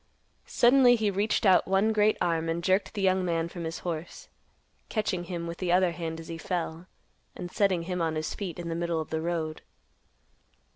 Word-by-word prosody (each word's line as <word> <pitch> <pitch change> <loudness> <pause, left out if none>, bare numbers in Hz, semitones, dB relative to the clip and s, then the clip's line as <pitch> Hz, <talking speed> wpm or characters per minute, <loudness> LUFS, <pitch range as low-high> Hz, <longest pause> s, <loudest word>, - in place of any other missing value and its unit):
Suddenly 245 0 +5
he 215 -3 0
reached 205 +3 0
out 190 -2 +5
one 195 +3 +2
great 215 0 +3
arm, 165 -2 0
and 170 +1 -2
jerked 190 +4 +1
the 200 - -2
young 190 0 +3
man 165 -2 0
from 170 -1 -7
his 160 0 -4
horse, 165 -1 -5 0.6
catching 190 -5 -1
him 170 -1 -4
with 170 0 -6
the 180 -2 -1
other 180 0 +4
hand 165 -1 -5
as 165 - -10
he 165 -1 -6
fell, 170 -1 -3 0.5
and 175 0 -7
setting 190 -4 +1
him 180 0 -3
on 160 -1 0
his 155 0 -2
feet 185 -6 -5
in 175 -1 -6
the 165 - -2
middle 170 -1 -1
of 155 - -6
the 160 0 -1
road. 160 -2 -3
175 Hz, 200 wpm, -28 LUFS, 165-190 Hz, 0.6 s, Suddenly